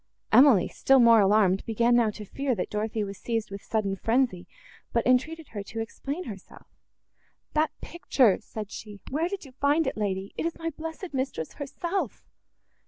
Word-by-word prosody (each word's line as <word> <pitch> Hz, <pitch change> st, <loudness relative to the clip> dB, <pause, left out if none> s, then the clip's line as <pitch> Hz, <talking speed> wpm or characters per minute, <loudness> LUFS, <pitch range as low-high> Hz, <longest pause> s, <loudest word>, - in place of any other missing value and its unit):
Emily, 250 Hz, -9 st, +7 dB
still 270 Hz, 0 st, +3 dB
more 230 Hz, -2 st, +7 dB
alarmed, 195 Hz, -1 st, +3 dB
began 235 Hz, +2 st, +3 dB
now 235 Hz, -2 st, +4 dB
to 210 Hz, 0 st, -8 dB
fear, 275 Hz, +4 st, -2 dB
that 185 Hz, -, -4 dB
Dorothée 215 Hz, 0 st, -1 dB
was 195 Hz, -1 st, -8 dB
seized 225 Hz, -2 st, -2 dB
with 200 Hz, 0 st, -6 dB
sudden 205 Hz, -3 st, -1 dB
frenzy, 225 Hz, -3 st, 0 dB, 0.4 s
but 235 Hz, -, +1 dB
entreated 285 Hz, +5 st, +1 dB
her 205 Hz, -, -5 dB
to 220 Hz, +3 st, -7 dB
explain 280 Hz, +9 st, -4 dB
herself. 200 Hz, -, -10 dB, 0.9 s
"That 310 Hz, 0 st, +2 dB
picture!" 260 Hz, -, +2 dB
said 215 Hz, -1 st, -7 dB
she, 210 Hz, -2 st, -9 dB
"where 320 Hz, +5 st, 0 dB
did 395 Hz, -4 st, -5 dB
you 270 Hz, -, -13 dB
find 285 Hz, +4 st, +2 dB
it, -, -, -2 dB
lady? 195 Hz, -2 st, -3 dB
it -, -, -2 dB
is 335 Hz, -, -5 dB
my 330 Hz, 0 st, -3 dB
blessed 325 Hz, +3 st, -7 dB
mistress 260 Hz, -, -3 dB
herself!" 340 Hz, +6 st, -4 dB
235 Hz, 170 wpm, -27 LUFS, 210-285 Hz, 0.9 s, Emily